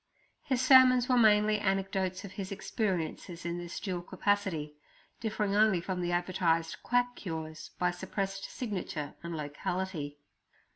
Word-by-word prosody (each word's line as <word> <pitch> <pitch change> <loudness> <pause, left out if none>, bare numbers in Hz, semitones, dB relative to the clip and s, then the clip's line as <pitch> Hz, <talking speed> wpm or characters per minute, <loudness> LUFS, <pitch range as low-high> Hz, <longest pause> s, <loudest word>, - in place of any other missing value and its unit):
His 255 -2 0
sermons 255 -1 +7
were 255 - +3
mainly 215 -2 +5
anecdotes 195 -1 -1
of 195 - -9
his 195 -1 -6
experiences 180 -4 -3
in 170 0 -2
this 175 -1 -6
dual 185 -4 -3
capacity, 185 -5 -1 0.5
differing 210 -3 -1
only 215 -3 +5
from 180 +1 -3
the 175 0 -1
advertised 175 -2 0
quack 245 0 +1
cures 160 -3 -6
by 180 0 +2
suppressed 195 +1 -3
signature 185 - -4
and 170 -1 -5
locality. 150 0 -3
190 Hz, 135 wpm, -31 LUFS, 170-210 Hz, 0.5 s, sermons